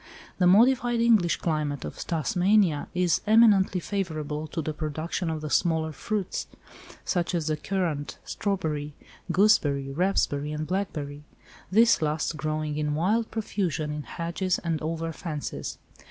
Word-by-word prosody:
The 180 - +5
modified 240 +4 +4
English 220 -7 +4
climate 150 -4 -2
of - - -6
Tasmania 175 +1 +1
is 180 -2 +2
eminently 210 -4 +5
favourable 155 -6 -3
to 165 - -5
the 155 0 -2
production 155 +3 -3
of 160 -1 -3
the 155 - -4
smaller 160 -2 +1
fruits, 195 +6 -3 0.6
such 175 -1 0
as 165 -3 -1
the 155 0 0
currant, 155 -3 -2
strawberry, 155 -7 -2 0.4
gooseberry, 145 -8 +3
raspberry 150 -3 0
and 155 0 -3
blackberry—this 180 +5 -1
last 155 +1 -1
growing 155 -1 -2
in 150 -1 0
wild 210 +8 +1
profusion 185 -8 -2
in 150 0 -4
hedges 170 +4 -2
and 165 -3 -1
over 165 +1 -2
fences. 150 -2 -5
165 Hz, 130 wpm, -27 LUFS, 150-190 Hz, 0.6 s, The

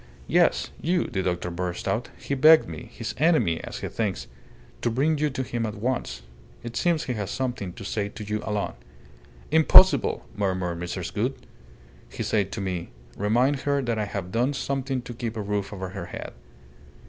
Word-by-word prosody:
"Yes, - - +3
you!" 175 +2 +2
the 95 - -2
doctor 90 -1 -1
burst 90 0 -3
out. - - -1
"He - - -4
begged 155 +4 +7
me 80 -2 -8
his - - -5
enemy, 140 - +3
as - - -6
he - - -2
thinks 95 - -2 0.6
to 120 - +1
bring 145 +6 +1
you 150 0 +2
to 130 -1 -3
him 120 -2 -3
at 110 -2 -3
once. 115 - -2 0.4
It 120 0 -6
seems 170 -3 +2
he 125 - -2
has 105 -4 -3
something 125 -8 -2
to - - -9
say 100 0 -1
to 105 - -8
you 105 +1 -2
alone." 105 -2 -2 0.8
"Impossible!" 160 +4 +6
murmured 95 -4 -1
Mrs. 85 0 -4
Gould. - - -1 0.7
"He - - -4
said 100 -3 +1
to 110 - -3
me, 90 -3 -3 0.3
'Remind 120 +8 +2
her 140 0 0
that 115 -3 -1
I 105 - 0
have 100 -3 -5
done 125 +7 +1
something 135 -2 -2
to 120 - -7
keep 115 -1 -4
a - - -1
roof 100 -1 -2
over 95 -2 -5
her - - -6
head. - - -7
110 Hz, 185 wpm, -26 LUFS, 95-130 Hz, 0.8 s, begged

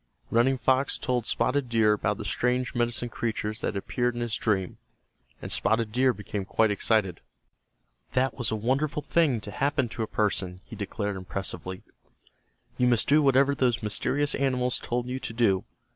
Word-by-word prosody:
Running 125 +3 +3
Fox 130 +2 +2
told 125 -3 -1
Spotted 130 -1 0
Deer 110 -2 +4
about 105 -1 -1
the - - -6
strange 125 +1 0
medicine 120 -1 0
creatures 110 -2 -3
that - - -1
had - - -3
appeared 120 +5 -1
in 120 - -3
his 120 -2 -1
dream, 95 -5 -1 0.6
and - - -5
Spotted 110 0 +1
Deer 130 +3 +3
became 105 -2 -5
quite 110 +3 +2
excited. 100 -3 +1 0.9
"That 130 +1 +2
was 120 -4 -2
a 110 - -1
wonderful 135 +7 0
thing 150 -6 +2
to 100 - -7
happen 140 +2 0
to 115 - -5
a 110 - -1
person," 95 -4 -1
he - - -10
declared, 100 -1 -3
impressively. 95 0 -5 1.0
"You 125 - +4
must 120 -2 +2
do 150 +2 +5
whatever 140 0 +4
those 125 -5 +1
mysterious 145 +8 0
animals 125 -2 0
told 120 0 -2
you 130 +1 -3
to 115 - -5
do. 105 -5 +2
120 Hz, 175 wpm, -27 LUFS, 105-130 Hz, 1.0 s, do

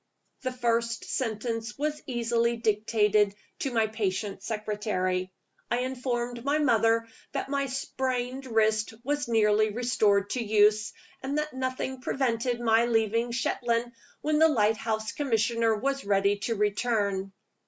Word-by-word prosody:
The 255 - -2
first 235 -2 0
sentence 230 -1 -3
was 300 +1 -2
easily 235 -1 +1
dictated 210 -2 +2 0.2
to 275 - -1
my 225 -2 +2
patient 205 -2 -2
secretary. 205 -4 -2 0.4
I 240 +1 +1
informed 245 -2 -3
my 285 +2 +2
mother 230 -5 +3 0.3
that - - -3
my 280 0 0
sprained 260 0 -3
wrist 220 -1 +1
was 290 +2 -1
nearly 215 -2 +3
restored 210 -3 +1
to 250 - -1
use, 215 0 +3 0.3
and 275 +2 -2
that 300 -1 -2
nothing 260 0 -3
prevented 245 -2 0
my 230 0 +3
leaving 230 +1 +1
Shetland 240 0 -1 0.3
when 305 0 +1
the 320 0 +6
lighthouse 220 -2 +1
commissioner 230 -4 +1
was 275 +5 -1
ready 200 0 +2
to 230 - +1
return. 205 -2 0
230 Hz, 130 wpm, -28 LUFS, 215-255 Hz, 0.4 s, the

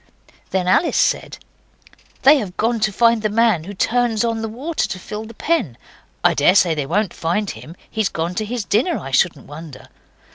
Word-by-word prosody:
Then 185 -1 -1
Alice 320 - +2
said, - - 0 0.9
'They 285 +3 +7
have 190 -6 -6
gone 230 +1 +1
to 215 0 +1
find 230 +2 +3
the 215 - 0
man 215 -6 +2
who 200 +2 -8
turns 235 +1 +1
on 230 -1 -1
the 225 - -2
water 285 +9 -2
to 185 - -5
fill 210 +4 -7
the 230 0 -12
pen. 280 - -1 0.5
I - - +4
daresay 175 +3 +4
they 145 -3 -3
won't 195 +4 0
find 175 +6 -1
him. 165 - -11
He's 220 -3 -1
gone 165 +2 -3
to - - -2
his 230 -1 -4
dinner, 250 - +1
I 135 - -7
shouldn't 145 +1 +1
wonder. 150 -1 -11
210 Hz, 190 wpm, -20 LUFS, 175-230 Hz, 0.9 s, They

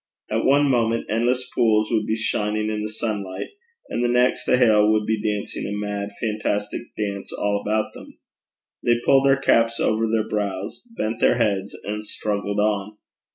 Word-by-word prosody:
At - - 0
one 140 +2 +5
moment 115 -3 +1
endless 125 +3 +1
pools 110 -2 +2
would 110 -2 +1
be 110 - +1
shining 110 0 -1
in 105 -1 -2
the 105 - -3
sunlight, 100 -4 -4 0.4
and 120 - -2
the - - +3
next 125 +1 +2
the - - +4
hail 110 -4 +5
would 110 -1 +2
be 110 0 0
dancing 105 -1 -3
a 105 +1 -3
mad 105 -1 -3
fantastic 105 -2 -2 0.2
dance 100 -2 -3
all 100 0 -1
about 110 +1 -1
them: - - -13 0.7
they 120 0 +3
pulled 135 0 +5
their 135 0 +5
caps 115 -3 +2
over 110 +1 +1
their 110 -1 0
brows, 100 -2 -3 0.2
bent 110 +2 -2
their 120 - +4
heads, 100 -4 0
and 105 +1 -4
struggled 100 -1 -3
on. 105 0 0
110 Hz, 175 wpm, -23 LUFS, 105-115 Hz, 0.7 s, one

